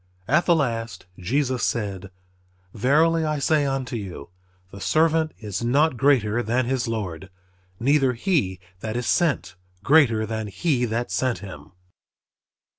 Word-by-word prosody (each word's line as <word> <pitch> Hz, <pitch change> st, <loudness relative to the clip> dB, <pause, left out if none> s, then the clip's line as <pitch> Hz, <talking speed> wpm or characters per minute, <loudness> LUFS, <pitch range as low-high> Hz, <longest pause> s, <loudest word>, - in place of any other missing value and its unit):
At 155 Hz, +8 st, +2 dB
the 170 Hz, -, +5 dB
last 115 Hz, -, -2 dB
Jesus 130 Hz, +6 st, -1 dB
said, 100 Hz, -4 st, -2 dB, 0.6 s
"Verily 155 Hz, +8 st, +3 dB
I 155 Hz, -1 st, -1 dB
say 145 Hz, +1 st, +2 dB
unto 135 Hz, -2 st, -3 dB
you, 95 Hz, -9 st, -7 dB, 0.4 s
the 100 Hz, -, -10 dB
servant 160 Hz, +2 st, +2 dB
is 105 Hz, -1 st, -5 dB
not 140 Hz, +5 st, +2 dB
greater 120 Hz, -4 st, +2 dB
than 120 Hz, +2 st, 0 dB
his 125 Hz, -1 st, -1 dB
Lord; 95 Hz, -5 st, -4 dB, 0.5 s
neither 135 Hz, 0 st, +3 dB
he 120 Hz, -, 0 dB, 0.2 s
that 110 Hz, +3 st, -4 dB
is 120 Hz, -, -3 dB
sent 145 Hz, -, +1 dB, 0.3 s
greater 130 Hz, -8 st, +4 dB
than 110 Hz, -1 st, -4 dB
he 125 Hz, -, 0 dB
that 120 Hz, +1 st, -3 dB
sent 130 Hz, -2 st, 0 dB
him." 95 Hz, -1 st, -11 dB
120 Hz, 135 wpm, -24 LUFS, 110-145 Hz, 0.6 s, the